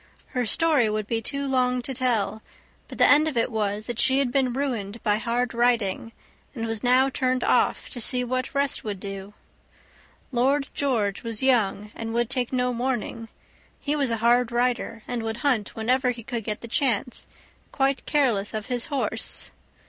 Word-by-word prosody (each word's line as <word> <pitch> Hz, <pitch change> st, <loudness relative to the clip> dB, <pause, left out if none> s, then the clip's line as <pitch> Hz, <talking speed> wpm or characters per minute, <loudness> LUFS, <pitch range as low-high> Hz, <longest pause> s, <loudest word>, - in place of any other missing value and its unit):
Her 250 Hz, -2 st, -1 dB
story 295 Hz, -, +3 dB
would 215 Hz, 0 st, -2 dB
be 225 Hz, +1 st, -1 dB
too 280 Hz, +4 st, -2 dB
long 250 Hz, -1 st, +1 dB
to 265 Hz, -, -2 dB
tell, 235 Hz, -4 st, 0 dB, 0.5 s
but -, -, -9 dB
the -, -, +6 dB
end 300 Hz, +2 st, +6 dB
of 290 Hz, -6 st, -2 dB
it 230 Hz, -, +1 dB
was 210 Hz, -1 st, -1 dB
that 240 Hz, -1 st, -4 dB
she 265 Hz, 0 st, +5 dB
had 275 Hz, -3 st, +2 dB
been 260 Hz, -1 st, +2 dB
ruined 240 Hz, -6 st, -3 dB
by 210 Hz, -2 st, +2 dB
hard 235 Hz, +1 st, -1 dB
riding, 235 Hz, -3 st, +1 dB, 0.4 s
and 230 Hz, -2 st, -3 dB
was 225 Hz, -2 st, -3 dB
now 255 Hz, +2 st, +4 dB
turned 255 Hz, -1 st, 0 dB
off -, -, +2 dB
to 245 Hz, -, -3 dB
see 250 Hz, +2 st, +2 dB
what 255 Hz, +2 st, -3 dB
rest 280 Hz, -1 st, +2 dB
would 205 Hz, -3 st, -4 dB
do. 195 Hz, +1 st, -7 dB, 1.0 s
Lord 270 Hz, +3 st, +2 dB
George 225 Hz, -8 st, 0 dB
was 230 Hz, 0 st, -3 dB
young 210 Hz, -5 st, +2 dB
and 225 Hz, 0 st, -5 dB
would 240 Hz, +1 st, 0 dB
take 250 Hz, -3 st, -1 dB
no 250 Hz, -1 st, +1 dB
warning; 240 Hz, -2 st, -3 dB, 0.5 s
he 295 Hz, +1 st, -1 dB
was 280 Hz, -4 st, +1 dB
a 230 Hz, -, 0 dB
hard 240 Hz, +2 st, +3 dB
rider, 240 Hz, -2 st, -1 dB
and 245 Hz, -1 st, -2 dB
would 225 Hz, 0 st, -3 dB
hunt 240 Hz, -8 st, +1 dB
whenever 250 Hz, +3 st, +1 dB
he 240 Hz, -2 st, -4 dB
could 235 Hz, -1 st, -4 dB
get 210 Hz, 0 st, -3 dB
the 235 Hz, -, -7 dB
chance, 245 Hz, -1 st, 0 dB, 0.4 s
quite 270 Hz, 0 st, 0 dB
careless 230 Hz, -9 st, +1 dB
of 215 Hz, -1 st, -3 dB
his 245 Hz, -2 st, -1 dB
horse. 240 Hz, -6 st, -1 dB
240 Hz, 185 wpm, -25 LUFS, 225-260 Hz, 1.0 s, the